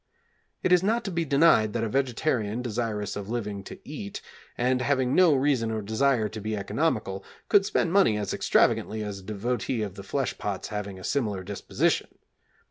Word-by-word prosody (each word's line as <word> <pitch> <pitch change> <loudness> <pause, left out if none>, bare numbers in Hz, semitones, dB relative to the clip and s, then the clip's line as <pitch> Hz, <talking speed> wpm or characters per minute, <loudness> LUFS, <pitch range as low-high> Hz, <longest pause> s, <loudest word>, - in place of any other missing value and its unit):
It 185 - +1
is 180 -1 +6
not 225 +5 +1
to 195 - -2
be 170 -1 -1
denied 140 -7 +4
that 115 - -1
a - - 0
vegetarian 125 -2 0
desirous 110 -3 -2
of 105 0 -6
living 105 -4 -3
to - - -8
eat, 105 -9 -6 0.4
and 125 +1 +1
having 130 -1 +1
no 175 -5 +6
reason 130 -4 +1
or 110 -1 -2
desire 110 +2 +2
to 110 +1 -7
be 110 +1 -2
economical, 100 -4 -1 0.3
could 200 -1 +5
spend 170 - 0
money 190 - +4
as 105 -2 -2
extravagantly 110 0 +2
as 100 -2 -5
a - - -14
devotee 110 +2 -2
of 100 -3 -5
the 100 - -9
flesh 130 +7 -2
pots 100 -2 -3
having 100 -2 -5
a 95 - -11
similar 105 -9 -1
disposition. 100 +1 -1
115 Hz, 185 wpm, -27 LUFS, 105-140 Hz, 0.4 s, is